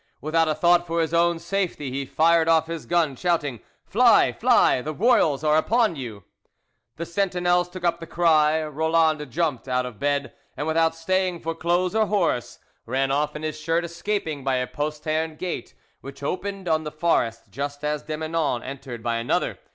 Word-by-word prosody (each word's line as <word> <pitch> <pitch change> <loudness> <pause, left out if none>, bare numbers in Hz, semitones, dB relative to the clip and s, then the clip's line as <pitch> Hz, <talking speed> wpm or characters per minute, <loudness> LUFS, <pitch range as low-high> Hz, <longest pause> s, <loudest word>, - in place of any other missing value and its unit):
Without 160 +2 +1
a 155 - 0
thought 175 +2 +3
for 170 0 -1
his 160 0 0
own 170 0 +3
safety, 175 -7 -3
he 135 +1 -3
fired 165 +2 +3
off 160 -1 +4
his 165 -1 -6
gun, 165 -5 +1
shouting, 150 -7 -1 0.3
"Fly! - - +5
fly! 125 - +3
The 155 +3 -5
royals 160 - +3
are 155 0 +3
upon 220 +3 +2
you!" 115 -8 -7 0.7
The 170 - -5
sentinels 180 -1 +1
took 180 0 -9
up 170 0 +1
the 165 - -8
cry, 160 -2 +3
Roland 155 -1 +1
jumped 150 -3 -2
out 125 0 0
of 120 -5 -8
bed, 140 +1 -1 0.2
and, 145 - -2
without 165 +1 +2
staying 180 +1 -1
for 165 0 -3
clothes 175 +3 0
or 220 -1 +2
horse, 180 - 0 0.3
ran 135 +3 0
off 150 +2 0
in 150 - -6
his 155 0 -4
shirt, 165 +2 0
escaping 170 -4 -3
by 135 -1 +1
a 125 0 0
postern 155 +3 -3
gate 180 +3 -5 0.2
which 140 +1 -11
opened 195 +4 -4
on 160 -1 +1
the 150 - -5
forest 135 -8 -1
just 145 +2 -5
as 150 0 -1
de 155 -1 -5
Menon 155 -6 -1
entered 130 -3 -8
by 115 0 0
another. 115 +1 -1
160 Hz, 180 wpm, -24 LUFS, 145-170 Hz, 0.7 s, Fly